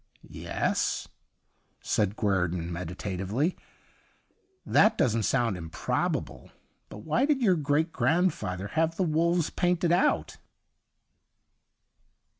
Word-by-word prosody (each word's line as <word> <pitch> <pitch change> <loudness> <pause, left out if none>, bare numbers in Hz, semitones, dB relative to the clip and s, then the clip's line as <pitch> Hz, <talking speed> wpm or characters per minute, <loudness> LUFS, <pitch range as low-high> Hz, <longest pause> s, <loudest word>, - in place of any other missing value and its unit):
' - - -34 0.3
Yes/ - - -1 0.7
said 105 -1 0
Guei'don 90 -5 -1
meditatively, 95 - -2 0.6
' 380 0 -42
that 215 - +5
doesn't 115 -2 +2
sound 120 -6 +1
improbable. 80 -2 -3 0.4
But 105 - -10
why 195 - +1
did 285 -4 +1
your 190 -5 +4
great 155 +1 0
grandfather 155 - 0
have 165 +6 0
the 190 - 0
wolves 170 +1 +1
painted 175 -1 +1
out 175 - +1
145 Hz, 100 wpm, -28 LUFS, -, 0.7 s, that